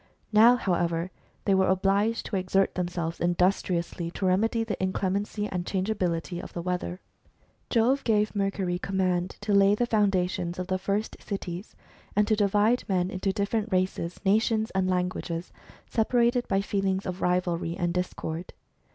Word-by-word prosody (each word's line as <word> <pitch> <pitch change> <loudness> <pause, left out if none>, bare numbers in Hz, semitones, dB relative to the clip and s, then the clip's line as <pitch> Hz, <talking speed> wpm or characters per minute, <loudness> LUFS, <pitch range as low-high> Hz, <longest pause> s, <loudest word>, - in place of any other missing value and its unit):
Now, 230 +3 +7
however, 175 -5 0 0.3
they 200 - +3
were 190 0 +3
obliged 200 +4 +1
to - - -3
exert 190 +1 +1
themselves 175 -2 -3
industriously 175 -1 0
to 190 - -4
remedy 220 +5 +2
the 225 -4 -4
inclemency 200 +2 -1
and 180 -3 -3
changeability 180 -3 -1
of - - -10
the 170 - -4
weather. 180 0 -3 0.7
Jove 255 +4 +2
gave 215 -2 +1
Mercury 195 -3 -1
command 185 -2 -1
to 205 0 -1
lay 200 +1 +5
the 240 - +1
foundations 185 -5 +1
of 185 - -3
the 185 0 -1
first 200 +3 -2
cities, 190 -2 -6 0.4
and 205 0 +3
to 215 - +3
divide 210 +3 +2
men 185 -1 +1
into 190 +1 -1
different 210 +2 -1
races, 185 -2 -1
nations, 220 +2 +2
and 190 -1 0
languages, 180 -1 -2 0.4
separated 240 +2 +2
by 195 - +1
feelings 195 -1 -1
of 180 0 -4
rivalry 175 -1 0
and 175 -2 0
discord. 180 -1 -4
190 Hz, 150 wpm, -27 LUFS, 180-210 Hz, 0.7 s, Now